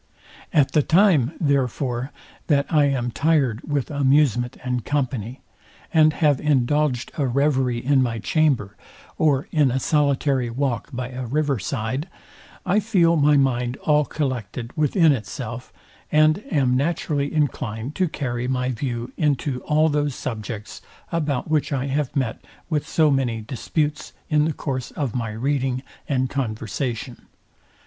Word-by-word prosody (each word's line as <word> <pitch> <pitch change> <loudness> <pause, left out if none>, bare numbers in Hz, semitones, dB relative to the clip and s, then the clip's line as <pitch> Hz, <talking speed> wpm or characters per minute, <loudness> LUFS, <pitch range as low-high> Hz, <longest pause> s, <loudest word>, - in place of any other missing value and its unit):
At 145 -3 +3
the 150 - +4
time, 165 - +4
therefore, 135 - 0 0.4
that 140 -3 +3
I 150 -2 +5
am 125 -4 0
tired 140 -6 +1
with 145 -1 -2
amusement 135 -3 +2
and 125 -2 -2
company, 130 -4 -2 0.5
and 155 -1 +5
have 150 -4 +2
indulged 145 -2 +1
a 140 - +2
reverie 130 -2 +1
in 140 -1 +4
my 120 -3 0
chamber, 130 -5 +1 0.4
or 145 0 +2
in 150 -5 +3
a 130 +2 0
solitary 140 -3 +1
walk 120 -2 -2
by 125 0 -4
a 130 -1 -5
river 145 -1 0
side, 130 - -3 0.6
I 195 +3 +3
feel 185 -6 +3
my 150 -1 +4
mind 125 -2 +1
all 150 -1 +4
collected 125 -5 -4
within 155 +2 +4
itself, 110 -9 -5 0.4
and 155 +5 +4
am 130 -4 +2
naturally 145 0 0
inclined 135 -4 -2
to 185 - +2
carry 120 -4 -3
my 125 0 0
view 120 -1 -4
into 140 -4 0
all 155 +1 +3
those 145 -3 0
subjects, 110 -3 -6 0.3
about 150 -6 -1
which 155 -1 0
I 135 -2 -1
have 140 0 -2
met 130 -5 -2 0.3
with 150 -2 0
so 155 -2 +3
many 125 -4 0
disputes 145 +6 -3 0.2
in 150 0 +4
the 160 - 0
course 130 -4 -4
of 140 -7 -3
my 115 -3 -2
reading 130 +3 -1 0.3
and 130 -2 +1
conversation. 120 0 -4
135 Hz, 140 wpm, -23 LUFS, 125-150 Hz, 0.6 s, I